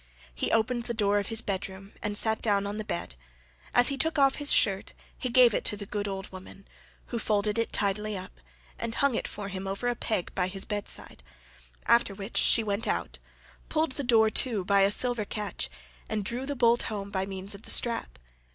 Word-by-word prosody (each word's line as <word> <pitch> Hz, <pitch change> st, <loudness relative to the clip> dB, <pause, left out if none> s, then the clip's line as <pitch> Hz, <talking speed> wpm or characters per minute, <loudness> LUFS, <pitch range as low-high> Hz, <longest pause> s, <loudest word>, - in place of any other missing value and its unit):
He -, -, -2 dB
opened 235 Hz, +1 st, +1 dB
the 235 Hz, -, -2 dB
door 205 Hz, -1 st, +2 dB
of 200 Hz, -, -3 dB
his 225 Hz, 0 st, +3 dB
bed 195 Hz, -3 st, -2 dB
room 195 Hz, +1 st, -12 dB
and 205 Hz, 0 st, 0 dB
sat 220 Hz, 0 st, +3 dB
down 200 Hz, -2 st, +2 dB
upon 205 Hz, +1 st, -3 dB
the -, -, -2 dB
bed; 170 Hz, -, -4 dB, 0.6 s
as 245 Hz, +2 st, +4 dB
he 275 Hz, -1 st, -3 dB
took 320 Hz, 0 st, 0 dB
off 275 Hz, -1 st, +4 dB
his 290 Hz, 0 st, +1 dB
shirt15 195 Hz, -2 st, +2 dB, 0.2 s
he 255 Hz, -, -4 dB
gave 245 Hz, -2 st, +6 dB
it -, -, 0 dB
to 210 Hz, -, 0 dB
the 200 Hz, -, -5 dB
good 205 Hz, +1 st, -3 dB
old 195 Hz, -1 st, -5 dB
woman, 190 Hz, +1 st, -12 dB, 0.4 s
who 235 Hz, -, -2 dB
folded 210 Hz, 0 st, +1 dB
it 230 Hz, -, 0 dB
tidily 210 Hz, +1 st, -1 dB
up, 185 Hz, 0 st, -8 dB, 0.5 s
and 230 Hz, 0 st, -3 dB
hung 280 Hz, -2 st, +2 dB
it -, -, -2 dB
for 200 Hz, -1 st, -6 dB
him 195 Hz, 0 st, -5 dB
over 200 Hz, +5 st, -3 dB
a 245 Hz, -, +1 dB
peg 215 Hz, -6 st, -2 dB
by 180 Hz, -1 st, 0 dB
his 190 Hz, +1 st, -2 dB
bed 205 Hz, -2 st, -3 dB
side, -, -, -2 dB, 0.6 s
after 235 Hz, -4 st, +3 dB
which 195 Hz, +3 st, -6 dB
she 230 Hz, -, +3 dB
went 205 Hz, +2 st, -2 dB
out, -, -, -2 dB, 0.5 s
pulled 315 Hz, -2 st, +1 dB
the 280 Hz, +2 st, -4 dB
door 225 Hz, -3 st, +4 dB
to 215 Hz, -7 st, +3 dB
by 200 Hz, 0 st, +4 dB
a 195 Hz, -, +5 dB
silver 240 Hz, +1 st, +1 dB
catch, 205 Hz, 0 st, -4 dB, 0.4 s
and 215 Hz, -2 st, -2 dB
drew 245 Hz, +5 st, -3 dB
the 285 Hz, -, -2 dB
bolt 240 Hz, -1 st, +4 dB
home 200 Hz, -2 st, -5 dB
by 190 Hz, -1 st, -1 dB
means 195 Hz, +1 st, -2 dB
of 200 Hz, -, -9 dB
the -, -, -12 dB
strap. 230 Hz, -, +1 dB
210 Hz, 220 wpm, -28 LUFS, 195-235 Hz, 0.6 s, gave